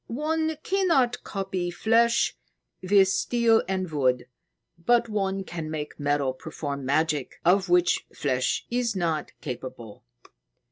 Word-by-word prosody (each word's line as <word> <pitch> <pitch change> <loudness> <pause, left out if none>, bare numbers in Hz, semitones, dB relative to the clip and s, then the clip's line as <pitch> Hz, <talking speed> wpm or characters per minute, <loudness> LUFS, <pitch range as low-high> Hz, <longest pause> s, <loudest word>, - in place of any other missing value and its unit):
"One 315 +4 -1
cannot 330 -11 +2
copy 190 -3 -3
flesh 230 +6 +2 0.5
with 195 +1 +5
steel 230 +3 +3
and 185 -3 -2
wood, 130 -4 +1 0.6
but 240 +3 +3
one 195 -2 -1
can 165 -4 -6
make 155 -1 -5
metal 145 -2 0
perform 140 0 -6
magic 150 -1 0
of 185 +1 +3
which 175 0 +3
flesh 130 -3 -1
is 240 -3 0
not 165 -4 -1
capable. 125 -4 -7
185 Hz, 120 wpm, -26 LUFS, 145-230 Hz, 0.6 s, with